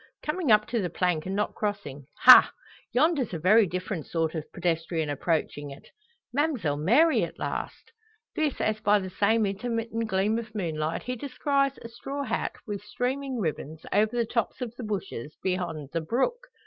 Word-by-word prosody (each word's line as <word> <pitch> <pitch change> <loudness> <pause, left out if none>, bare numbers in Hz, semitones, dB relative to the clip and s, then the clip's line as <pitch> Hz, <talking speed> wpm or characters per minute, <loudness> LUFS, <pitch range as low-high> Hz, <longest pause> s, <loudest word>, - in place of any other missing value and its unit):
Coming 305 -3 0
up 215 0 +6
to 235 -2 0
the 180 - -2
plank 175 -1 0
and 190 - -2
not 210 +1 -1
crossing 200 -11 -4
Ha! - - +10 0.4
yonder's 270 - +2
a - - -1
very 200 +6 +5
different 180 -2 -4
sort 165 -1 -1
of 155 -2 -6
pedestrian 165 -2 -1
approaching 145 -1 -1
it? 140 - -12 0.5
Ma'mselle 260 - 0
Mary 300 - +5
at - - -5
last!" - - -5 0.4
This 305 -3 0
as 215 0 0
by 210 0 +4
the 190 -2 -4
same 215 +3 +2
intermittent 230 +2 -2
gleam 210 +3 +1
of 220 -2 -9
moonlight 160 -5 -2
he 250 - -3
descries 275 +2 0
a - - -6
straw 275 +5 -5
hat, - - -2
with 205 -2 -4
streaming 255 +5 -3
ribbons, 155 -3 -4
over 215 +4 +2
the 235 - +2
tops 230 0 -2
of 240 -2 -5
the 245 - -7
bushes 185 - -5
beyond 175 -6 -2
the 165 - 0
brook. 470 - -1
210 Hz, 175 wpm, -27 LUFS, 170-245 Hz, 0.5 s, Ha